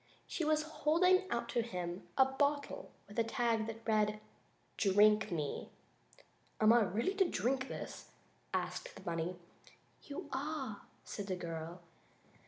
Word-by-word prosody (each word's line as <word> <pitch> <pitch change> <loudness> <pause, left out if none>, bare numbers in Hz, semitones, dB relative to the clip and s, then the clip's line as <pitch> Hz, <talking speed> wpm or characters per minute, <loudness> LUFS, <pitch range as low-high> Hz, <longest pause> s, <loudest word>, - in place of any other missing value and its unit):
She 335 - -3
was 305 0 +3
holding 360 +5 +3
out 235 0 -1
to 240 - +2
him 180 -5 -4
a 265 - +8
bottle 285 +2 0 0.2
with 205 +3 -4
a - - +5
tag 225 -1 +1
that 225 0 -7
read: 215 -1 +2 0.6
"DRINK 210 +1 +5
ME." 150 -4 -2 0.9
"Am 220 +1 +7
I 240 - +6
really 215 - +1
to 385 -3 +3
drink 260 +1 0
this?" - - -7 0.4
asked - - -3
the - - -11
bunny. 170 +1 -2 0.7
"You 285 - -7
are," 270 -6 -3 0.2
said 200 -2 -5
the 185 - -1
little 175 -2 -5
girl. 165 +2 -6
230 Hz, 145 wpm, -35 LUFS, 200-285 Hz, 0.9 s, a